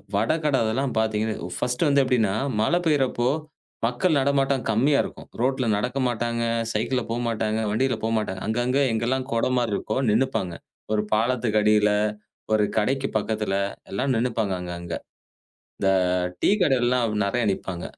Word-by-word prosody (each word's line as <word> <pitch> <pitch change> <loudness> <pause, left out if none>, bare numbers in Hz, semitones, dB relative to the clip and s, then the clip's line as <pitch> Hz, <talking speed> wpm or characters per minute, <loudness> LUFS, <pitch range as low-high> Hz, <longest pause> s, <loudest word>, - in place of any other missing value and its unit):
வட 110 +3 +2
கட 145 -3 +3
அதெல்லாம் 125 +4 -1
பாத்தீங்கன்னா 110 0 0
ஒ - - -6
ஃபர்ஸ்ட்டு 125 +5 0
வந்து 140 0 +4
எப்படின்னா, 115 -6 +2 0.3
மழை 170 +11 +2
பெய்யிறப்போ, 130 -5 +2 0.6
மக்கள் 145 +7 +1
நடமாட்டம் 135 -1 +1
கம்மியா 140 +6 +3
இருக்கும். - - -9
ரோட்டுல 130 0 +1
நடக்க 125 +5 -2
மாட்டாங்க, 115 0 -1 0.3
சைக்கிள்ல 120 +3 0
போமாட்டாங்க, 115 -2 -1
வண்டில 130 +3 +1
போமாட்டாங்க. 110 -4 -1
அங்கங்க 120 +4 +1
எங்கல்லாம் 125 +3 -1
கொட 115 - +1
மாரி 120 -4 0
இருக்கோ 110 - -2
நின்னுப்பாங்க. 110 -6 0 0.4
ஒரு 105 - +2
பாலத்துக்கு 115 -1 +1
அடியில, 105 0 +4 0.6
ஒரு 110 -1 +4
கடைக்கு 135 +6 +1
பக்கத்துல, 105 -2 -1 0.4
எல்லாம் 130 +8 0
நின்னுப்பாங்க, 115 -4 0
அங்க 90 0 -6
அங்க. 85 -1 -6 0.9
இந்த 95 - +1 0.5
டீ - - +4
கடையிலலாம் 125 -4 +2
அப்டி 105 -2 -1
நெறையா 120 +4 0
நிப்பாங்க. 90 -2 -5
115 Hz, 145 wpm, -24 LUFS, 110-130 Hz, 0.9 s, வந்து